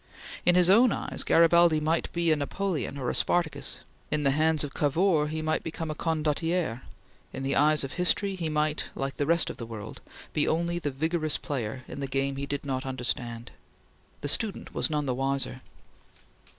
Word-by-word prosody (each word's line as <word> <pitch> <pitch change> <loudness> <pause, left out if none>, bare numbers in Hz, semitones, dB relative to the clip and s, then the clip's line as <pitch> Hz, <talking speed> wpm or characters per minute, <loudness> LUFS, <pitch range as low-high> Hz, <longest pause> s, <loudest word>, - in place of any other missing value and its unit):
In 175 - +6
his 180 -1 +5
own 230 +6 +6
eyes - - -3
Garibaldi 170 -1 +5
might 160 +2 0
be 170 -1 +1
a - - +5
Napoleon 155 +1 -2
or 125 -3 -1
a - - -4
Spartacus; 170 -3 0 0.3
in 150 0 0
the 140 - +4
hands 155 +1 +2
of 145 - -5
Cavour 155 +1 +2
he 155 +1 -3
might 155 0 0
become 160 -1 -4
a - - -2
Condottiere; 160 -3 -1 0.5
in 135 - -6
the 135 - 0
eyes 150 0 +4
of 135 - -5
history 195 +3 +1
he 165 -4 -3
might, 150 0 0
like 135 0 -3
the 145 - 0
rest 170 +1 +2
of - - -11
the 115 - -6
world, 110 -1 -8 0.3
be 150 - +2
only 170 +1 0
the 150 - -2
vigorous 155 +3 0
player 130 -2 -4
in - - -7
the 140 - -2
game 135 +1 -1
he 140 0 -4
did 145 0 -3
not 130 -1 -2
understand. 120 -3 -3 0.7
The - - -3
student 205 +7 -1
was - - +1
none 150 -1 -1
the 130 - 0
wiser. 135 0 -2
150 Hz, 190 wpm, -28 LUFS, 135-165 Hz, 0.7 s, In